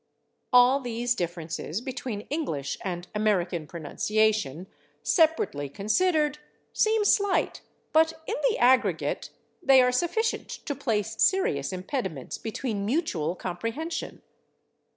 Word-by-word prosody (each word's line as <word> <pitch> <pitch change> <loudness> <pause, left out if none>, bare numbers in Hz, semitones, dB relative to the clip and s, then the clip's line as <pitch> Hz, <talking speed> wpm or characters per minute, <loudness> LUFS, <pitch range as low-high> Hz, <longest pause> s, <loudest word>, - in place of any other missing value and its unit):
" - - -49
All 250 +2 +6
these 240 -1 -1
differences 170 -2 -4
between 250 -4 -5
English 155 - -2
and 180 -2 -4
American 185 -7 0
pronunciation, 180 +1 0 0.4
separately 315 - +2
considered, 300 - +1 0.3
seem 435 -1 +2
slight, 405 -1 +2 0.3
but 320 +1 +5
in 430 - -3 0.2
the 445 - -1
aggregate 255 +1 +2 0.3
they 270 -5 +6
are 250 -1 +5
sufficient 350 - 0
to 285 - -5
place 225 -5 -2
serious 150 - +2
impediments 185 - -4
between 220 -2 -3
mutual 200 - -1
[Pg176] - - -22
comprehension. 230 - -4
230 Hz, 110 wpm, -27 LUFS, 180-300 Hz, 0.4 s, All